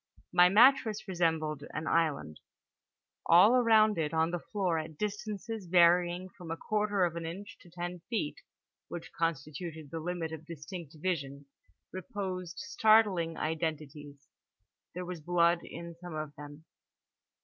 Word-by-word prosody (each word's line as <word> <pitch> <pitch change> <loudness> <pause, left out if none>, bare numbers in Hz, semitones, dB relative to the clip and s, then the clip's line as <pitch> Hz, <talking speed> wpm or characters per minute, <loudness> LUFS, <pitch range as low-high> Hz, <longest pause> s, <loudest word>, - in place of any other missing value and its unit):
My 180 0 +7
mattress 220 0 +5
resembled 160 -5 0
an 155 - -3
island: 150 - 0 0.9
all 180 +7 +7
around 220 -5 +4
it 155 0 -1
on 160 +1 +2
the 175 - -2
floor 180 -4 -1
at 155 -1 -8
distances 210 0 -4
varying 175 +1 +4
from 175 -2 -12
a 165 - -3
quarter 210 -1 0
of 170 -1 -3
an 170 - -4
inch 195 +5 -8
to 175 - -17
ten 175 +1 -5
feet 215 -11 -2 0.5
(which 170 - -8
constituted 160 -1 -3
the 165 - -4
limit 165 0 -3
of 160 0 -8
distinct 165 0 -8
vision) 145 -5 -3 0.5
reposed 185 -2 -5
startling 205 -7 +3
identities. 150 -3 -4 0.7
There 180 0 -4
was 175 -2 -6
blood 170 +1 +3
in 170 0 -8
some 170 -1 -9
of 155 -1 -5
them. 145 +2 -11
170 Hz, 140 wpm, -31 LUFS, 160-185 Hz, 0.9 s, My